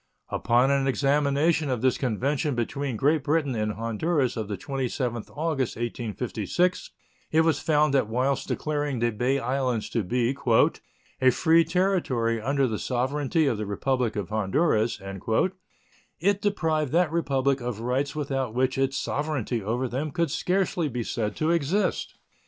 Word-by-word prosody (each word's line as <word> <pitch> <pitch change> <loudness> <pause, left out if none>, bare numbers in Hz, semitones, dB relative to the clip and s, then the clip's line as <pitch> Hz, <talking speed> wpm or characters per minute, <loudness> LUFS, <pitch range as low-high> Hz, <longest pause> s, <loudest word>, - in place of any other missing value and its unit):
Upon 125 +3 +2
an 135 -1 +2
examination 145 +3 +2
of 125 -2 -2
this 130 - +2
convention 135 +4 0
between 130 +2 -2
Great 150 +4 +2
Britain 150 -2 +1
and 105 -2 -1
Honduras 125 +6 0
of 110 -2 -3
the 100 -1 -4
27th 125 -1 -3
August, 150 -5 -2
1856, 120 - -2 0.4
it 160 - +4
was 160 -3 +2
found 150 -1 +2
that 135 -6 +3
whilst 130 +5 0
declaring 145 -3 -2
the 120 0 +1
Bay 125 +5 0
Islands 125 -3 -1
to 115 - +1
be 120 +6 0 0.9
"a 130 - +6
free 165 +6 +4
territory 160 - 0
under 140 +3 +1
the 110 -4 -2
sovereignty 140 +5 0
of 120 -6 0
the 105 - -3
Republic 125 +3 -1
of 100 -4 -3
Honduras" 110 - +1 1.2
it 200 +4 +1
deprived 160 -8 0
that 170 -2 +3
Republic 140 -5 +1
of 120 -3 -4
rights 130 +5 -1
without 135 -5 -2
which 130 +1 +1
its 135 +1 +1
sovereignty 140 -6 -2
over 120 +6 -1
them 135 +6 -3
could 165 0 -1
scarcely 180 -1 0
be 120 -2 -3
said 110 -1 -2
to 155 +1 +1
exist. 170 +5 0
135 Hz, 150 wpm, -26 LUFS, 120-150 Hz, 1.2 s, a